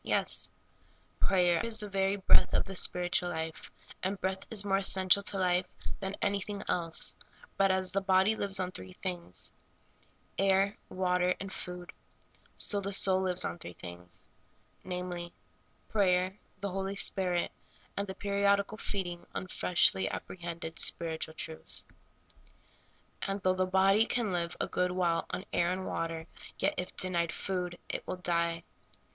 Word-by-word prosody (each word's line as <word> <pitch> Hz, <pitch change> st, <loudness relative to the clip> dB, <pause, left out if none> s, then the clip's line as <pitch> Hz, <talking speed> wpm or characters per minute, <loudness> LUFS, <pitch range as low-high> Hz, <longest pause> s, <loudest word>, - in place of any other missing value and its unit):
Yes. -, -, +1 dB, 0.7 s
Prayer 175 Hz, -3 st, +3 dB
is 230 Hz, -1 st, -1 dB
the 210 Hz, -, -5 dB
very 195 Hz, 0 st, +1 dB
breath 195 Hz, -, +5 dB
of -, -, +2 dB
the 195 Hz, -, -7 dB
spiritual 180 Hz, +1 st, +2 dB
life, 160 Hz, -1 st, -4 dB, 0.3 s
and 190 Hz, +1 st, -2 dB
breath 190 Hz, 0 st, -2 dB
is 210 Hz, -3 st, 0 dB
more 195 Hz, -1 st, +3 dB
essential 190 Hz, 0 st, +5 dB
to 200 Hz, 0 st, -1 dB
life 180 Hz, -1 st, +2 dB, 0.3 s
than 195 Hz, 0 st, -3 dB
anything 200 Hz, 0 st, -1 dB
else; 165 Hz, -2 st, +1 dB, 0.4 s
but 195 Hz, 0 st, +3 dB
as 190 Hz, 0 st, +1 dB
the 195 Hz, -, +1 dB
body 190 Hz, +2 st, +4 dB
lives 195 Hz, -2 st, +4 dB
on 185 Hz, -1 st, -1 dB
three 95 Hz, -, -7 dB
things 90 Hz, 0 st, -3 dB, 0.4 s
— -, -, -35 dB
air, 195 Hz, +1 st, +3 dB, 0.2 s
w^ater, 180 Hz, -1 st, +1 dB
and 195 Hz, -1 st, -6 dB
food 180 Hz, 0 st, -7 dB, 0.3 s
— -, -, -33 dB
so 205 Hz, -1 st, +2 dB
the 200 Hz, +1 st, -3 dB
soul 190 Hz, -1 st, +3 dB
lives 185 Hz, -1 st, +4 dB
on 175 Hz, -, -4 dB
three 90 Hz, -, -8 dB
things 90 Hz, 0 st, -6 dB, 0.3 s
— -, -, -36 dB
namely, 180 Hz, -1 st, -5 dB, 0.5 s
prayer, 185 Hz, -2 st, +2 dB, 0.3 s
the 200 Hz, -, -1 dB
Holy 195 Hz, +1 st, -2 dB
Spirit, 180 Hz, -3 st, +3 dB, 0.4 s
and 200 Hz, 0 st, -2 dB
the 190 Hz, -, -6 dB
periodical 200 Hz, +1 st, +1 dB
feeding 175 Hz, -3 st, -3 dB
on -, -, -2 dB
freshh 180 Hz, -1 st, +3 dB, 0.2 s
apprehended 170 Hz, -2 st, -6 dB
spiritual 160 Hz, -1 st, -1 dB
truth. 160 Hz, 0 st, -5 dB, 1.4 s
And 195 Hz, +1 st, -2 dB
though 185 Hz, -, +4 dB
the 185 Hz, 0 st, 0 dB
body 195 Hz, +4 st, +4 dB
can 235 Hz, -5 st, 0 dB
live 170 Hz, -1 st, -2 dB
a -, -, +1 dB
good 180 Hz, 0 st, 0 dB
while 175 Hz, -2 st, +1 dB
on 190 Hz, -, -4 dB
air 175 Hz, +1 st, +2 dB
and 185 Hz, +1 st, -3 dB
water, 165 Hz, -2 st, -3 dB, 0.3 s
yet, -, -, +1 dB
if 180 Hz, -, -5 dB
denied 170 Hz, -2 st, +1 dB
food, 180 Hz, -2 st, -3 dB
it -, -, -4 dB
will 185 Hz, -, -3 dB
die. 170 Hz, -2 st, 0 dB
185 Hz, 155 wpm, -31 LUFS, 175-195 Hz, 1.4 s, breath